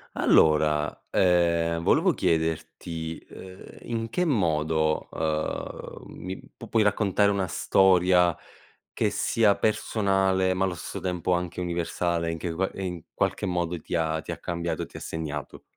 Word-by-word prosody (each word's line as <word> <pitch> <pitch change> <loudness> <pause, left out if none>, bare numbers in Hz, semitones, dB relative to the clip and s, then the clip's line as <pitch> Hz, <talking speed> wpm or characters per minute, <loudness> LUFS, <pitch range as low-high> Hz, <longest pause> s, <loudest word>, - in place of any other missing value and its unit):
Allora, 75 -1 +3
ehm, 85 -2 +2
volevo - - +4
chiederti, 80 0 -2
uhm, 95 0 -11 0.2
in 115 -1 -3
che 180 +10 0
modo, 80 - +1
uhm, 80 -1 -3 0.2
mi 95 +1 -5
p - - -13
puoi 110 -2 +2
raccontare 100 0 +2
una 100 -2 0
storia 90 -1 +4 0.6
che - - 0
sia 110 -3 +2
personale, 95 -3 +1
ma 95 +1 +1
allo 90 -2 -2
stesso - - -6
tempo 90 -1 -2
anche 90 0 -1
universale, 85 -1 -1
in 80 - -3
che 85 +1 -3
qua 95 +3 0
e 95 - -6
in 90 -3 -4
qualche - - -1
modo 90 -2 -1
ti 85 - -5
ha 80 -1 0
ti - - -5
ha - - -8
cambiato 85 0 -3
e - - -2
ti - - -11
ha - - -7
segnato? 75 -3 -5
90 Hz, 150 wpm, -26 LUFS, 80-95 Hz, 0.6 s, volevo